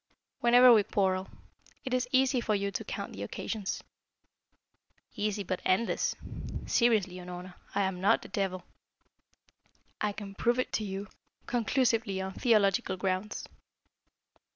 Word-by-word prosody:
"Whenever 245 +1 +7
we 215 - +6
quarrel. 190 -1 0 0.6
It 260 - -3
is 250 -1 +1
easy 260 -1 +3
for 215 -2 +1
you 200 0 -1
to - - -3
count - - -5
the - - -8
occasions." 210 -4 -4 1.3
"Easy, 210 -1 -1
but 185 0 -3
endless. 200 +5 +1 0.5
Seriously, 215 -7 +2
Unorna, 180 +1 -8 0.2
I 200 - +3
am 190 -1 -2
not 195 - +3
the - - -9
devil. 190 -2 -2 1.4
I 210 - +1
can 200 -1 -8
prove 240 +4 +1
it 255 - -1
to 215 - 0
you 195 0 -4 0.4
conclusively 230 -4 +1
on 190 0 -4
theological 210 -3 +2
grounds." 190 +2 -2
205 Hz, 130 wpm, -30 LUFS, 190-235 Hz, 1.4 s, Whenever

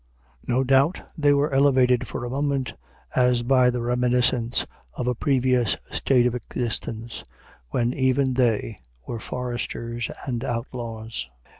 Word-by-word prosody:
No 125 +2 +2
doubt 135 +6 +3 0.2
they 145 -4 +3
were 145 0 +2
elevated 130 -3 +4
for - - -4
a - - -4
moment 140 -1 -1 0.4
as 125 -1 +3
by 125 0 +4
the 125 -1 -2
reminiscence 125 0 +1 0.3
of 125 - -3
a 125 - +1
previous 125 -3 +2
state 125 -3 +3
of 125 - +2
existence, 115 -2 -4 0.5
when 120 - 0
even 130 0 +2
they 115 -4 +1 0.3
were 115 - -4
foresters 120 -1 -4 0.2
and 120 -3 -2
outlaws. 115 - -4
125 Hz, 130 wpm, -24 LUFS, 120-130 Hz, 0.5 s, elevated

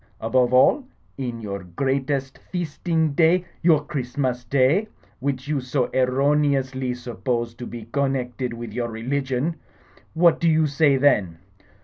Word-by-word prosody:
Above 125 +2 +2
all, 130 - +5 0.4
in 120 -3 -4
your 100 -3 -5
greatest 135 +7 -2
feasting 165 -2 -2
day 170 +4 +3
— - - -34
^your 155 -4 +3
Christmas 130 -4 -2
day 140 - +2 0.2
— - - -34
^which 135 0 -2
you 150 -2 0
so 125 0 -1
erroneously 135 0 +1
suppose 120 -1 -3
to 120 +1 -8
be 120 -2 -7
connected 130 -2 -1
with 115 -2 -7
your 120 0 -2
religion, 130 +6 -2 0.6
what 170 0 +4
do 170 - +3
you 160 0 +3
say 145 -1 +3
then 105 -12 +2
130 Hz, 140 wpm, -23 LUFS, 125-145 Hz, 0.6 s, all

